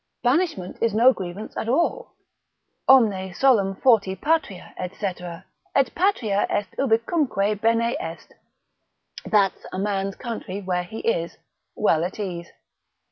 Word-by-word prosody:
Banishment 250 - 0
is 230 -2 +1
no 245 +4 +6
grievance 190 +2 -7
at 225 - -3
all, 340 - 0 0.7
Omne 200 -8 +4
solum 205 -7 +3
forti 200 -5 +3
patria, 290 - -1
&c. 185 +3 -5
et 180 +8 -3
patria 265 - +1
est 205 -2 -2
ubicunque 225 - +1
bene 230 +1 +2
est, - - -8 0.9
that's 200 -3 +2
a - - -5
man's 195 0 -1
country 220 -5 -5
where 185 -2 -1
he 220 +5 -7
is 170 -7 -1 0.4
well 165 -6 +2
at 180 +4 -4
ease. 175 -4 -5
205 Hz, 125 wpm, -24 LUFS, 190-240 Hz, 0.9 s, no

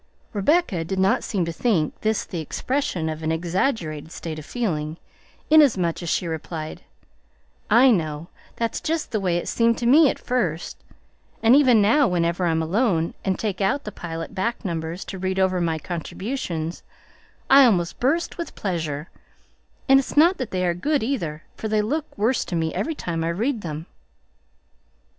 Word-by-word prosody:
Rebecca 210 - +2
did 190 +4 -4
not 190 +1 +2
seem 190 -5 -1
to 165 - -4
think 170 -6 0
this 220 0 0
the 175 - -5
expression 180 - -2
of 155 0 -4
an 160 0 -1
exaggerated 165 - -1
state 160 -2 -6
of 150 - -10
feeling, 160 -10 -2 0.5
inasmuch 215 - +4
as 170 - -4
she 180 - 0
replied, 160 -1 -5 0.9
"I 245 +4 +6
know; 155 -5 -1 0.3
that's 230 -1 -2
just 320 -1 -2
the 215 - 0
way 180 -3 0
it 175 - -4
seemed 230 0 +2
to 240 - -3
me 285 +4 +6
at - - -2
first, 185 -10 -2 0.6
and 230 +3 +7
even 250 -7 +5
now, 250 +7 +4
whenever 175 -1 0
I'm 160 -1 +1
alone 170 -2 +1
and 190 -2 0
take 205 -3 -3
out 235 +9 +1
the 210 - -6
Pilot 165 -2 -6
back 225 +4 -2
numbers 165 0 -4
to 190 - -7
read 190 0 -2
over 185 -1 +2
my 165 -2 0
contributions, 170 - -4 0.7
I 275 +1 +8
almost 180 -7 +1
burst 325 +8 0
with 340 - -5
pleasure; 160 -5 -3 0.8
and 270 0 +7
it's 275 - -5
not 340 +5 +5
that 255 - -3
they 185 -1 -1
are 175 - +2
good 285 - 0
either, 170 - -3
for 220 - -4
they 215 -1 +1
look 295 +8 -3
worse 230 +5 +1
to 175 - -4
me 160 -1 -1
every 320 - -2
time 165 - -3
I 165 - 0
read 225 +7 -1
them." 160 -2 -5
190 Hz, 175 wpm, -23 LUFS, 165-240 Hz, 0.9 s, I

